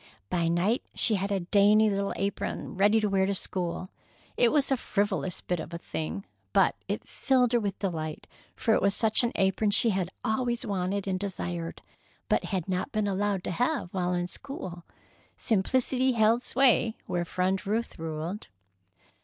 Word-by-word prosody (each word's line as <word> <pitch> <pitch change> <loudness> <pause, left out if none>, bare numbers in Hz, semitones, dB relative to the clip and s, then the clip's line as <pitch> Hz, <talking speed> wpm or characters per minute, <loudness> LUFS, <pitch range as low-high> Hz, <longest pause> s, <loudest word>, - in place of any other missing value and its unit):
By 170 -2 +1
night 180 +8 +1
she 225 - +5
had 200 0 -1
a 195 -2 0
dainty 205 +4 +4
little 200 -1 0
apron 200 +1 -3
ready 205 +3 +4
to 210 - +1
wear 190 -1 +2
to 200 - 0
school. 185 0 -2 0.4
It 240 - +4
was 290 -3 +2
a - - +5
frivolous 200 -5 -1
bit 180 -2 -2
of 170 - -6
a - - -2
thing, 170 +3 -5 0.3
but - - +4
it - - -3
filled 255 -3 +2
her 240 - +4
with 200 -3 -3
delight, 160 -5 -4 0.3
for 235 -3 +1
it - - +3
was 200 0 +2
such 220 +1 +3
an 240 - +1
apron 195 +3 +2
as 205 - +3
she 230 - +4
had 185 -2 -1 0.2
always 240 +2 0 0.5
desired, 175 -4 -4 0.5
but - - +2
had 190 -4 -2
not 185 -1 -2
been 215 -2 0
allowed 200 -1 0
to - - -3
have 245 - -1
while 180 -1 0
in 175 0 -1
school. 180 -4 -7 0.5
Simplicity 255 +4 +1
held 225 +1 +3
sway 250 -3 +3
where 175 -1 -1
Friend 185 +2 -1
Ruth 225 -1 -2
ruled. 165 +5 -4
200 Hz, 170 wpm, -28 LUFS, 180-225 Hz, 0.5 s, she